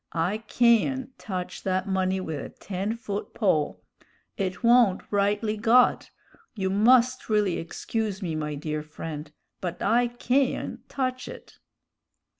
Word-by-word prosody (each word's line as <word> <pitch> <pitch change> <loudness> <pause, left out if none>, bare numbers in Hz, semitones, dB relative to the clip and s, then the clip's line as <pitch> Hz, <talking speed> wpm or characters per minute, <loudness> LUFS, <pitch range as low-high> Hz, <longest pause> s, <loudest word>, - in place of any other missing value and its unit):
I 175 +6 0
cayn't 245 +2 +2
touch 180 -1 -5
that 185 0 -1
money 190 0 +1
with 160 -5 -4
a - - -7
ten 200 +3 -4
foot 210 -3 -5
pole; 160 -9 +1 0.5
it 185 0 -3
wa'n't 235 -5 +5
rightly 205 +2 +1
got; 235 +3 +4 0.5
you 190 -3 -1
must 245 +5 +4
really 210 -4 +2
excuse 205 +4 -3
me, 175 -5 -3
my 150 -1 -3
dear 155 +1 -3
friend, 150 0 -7 0.3
but 180 -2 -4
I 240 +3 +3
cayn't 250 +2 -1
touch 255 -1 -2
it." - - -11
200 Hz, 130 wpm, -26 LUFS, 180-235 Hz, 0.5 s, wa'n't